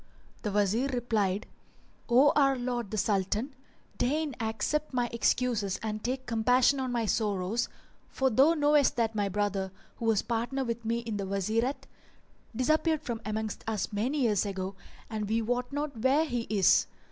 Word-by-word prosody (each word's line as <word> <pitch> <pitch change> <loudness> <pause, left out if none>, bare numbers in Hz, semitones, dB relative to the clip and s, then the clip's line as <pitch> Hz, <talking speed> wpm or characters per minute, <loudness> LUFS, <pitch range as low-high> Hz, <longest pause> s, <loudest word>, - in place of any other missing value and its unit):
The 210 - -2
Wazir 205 +5 +1
replied, 220 -7 0 0.6
"O 260 +5 +6
our 275 -2 +4
lord 245 -3 -3
the 215 - -4
Sultan, 210 +6 0 0.5
deign 295 +1 0
accept 230 +7 -1
my 245 -1 +1
excuses 230 -4 +1
and 215 -1 -3
take 260 +1 -2
compassion 245 +4 +3
on 260 -1 -2
my 235 -2 0
sorrows, 205 0 0 0.4
for 265 -1 +1
thou 275 +9 +5
knowest 295 -2 +3
that 225 -2 0
my 205 -2 0
brother, 195 -1 -1 0.3
who 230 - -5
was 225 -3 +2
partner 240 +4 -1
with 235 0 -3
me 230 +1 -1
in 225 -3 -4
the 195 -1 -3
Wazirate, 220 +7 -1 0.7
disappeared 310 +5 +1
from 235 -5 -4
amongst 215 0 -3
us 215 -1 -2
many 255 +8 0
years 215 -6 +2
ago 195 -1 -4 0.3
and 215 -2 -4
we 225 +1 +2
wot 245 +3 -1
not 290 -1 -3
where 275 +6 +3
he 240 -5 -3
is. 200 -4 +4
230 Hz, 160 wpm, -29 LUFS, 210-260 Hz, 0.7 s, O